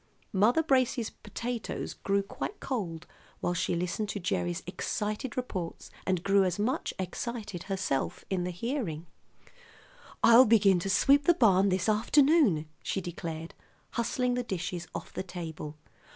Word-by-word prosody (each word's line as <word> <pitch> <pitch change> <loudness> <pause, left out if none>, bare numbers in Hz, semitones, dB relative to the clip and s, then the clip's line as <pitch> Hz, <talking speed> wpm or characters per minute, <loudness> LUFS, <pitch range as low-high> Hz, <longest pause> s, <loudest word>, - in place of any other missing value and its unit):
Mother 225 +11 +4
Brace's 255 -5 +2
potatoes 240 -1 -5
grew 200 0 0
quite 400 - -6
cold 175 - -3 0.3
while 175 - 0
she 180 0 0
listened 180 +5 -2
to 205 - -3
Gerry's 175 -1 -1
excited 210 +7 -3
reports, 185 -9 -4 0.2
and 185 -2 +1
grew 195 0 +4
as 185 0 0
much 220 +6 0
excited 195 0 -4
herself 180 -3 -1
in 190 -2 -1
the 180 - -2
hearing. 180 - -3 1.2
"I'll 235 +3 +9
begin 205 -5 +5
to 195 - -3
sweep 280 +9 +4
the 345 - +5
barn 200 - +5
this 185 -1 0
afternoon," 230 - +4
she - - -2
declared, 165 -2 -6 0.4
hustling 245 +1 0
the 250 - 0
dishes 180 -5 -4
off - - -6
the - - -3
table. 160 -5 -7
195 Hz, 140 wpm, -29 LUFS, 175-235 Hz, 1.2 s, I'll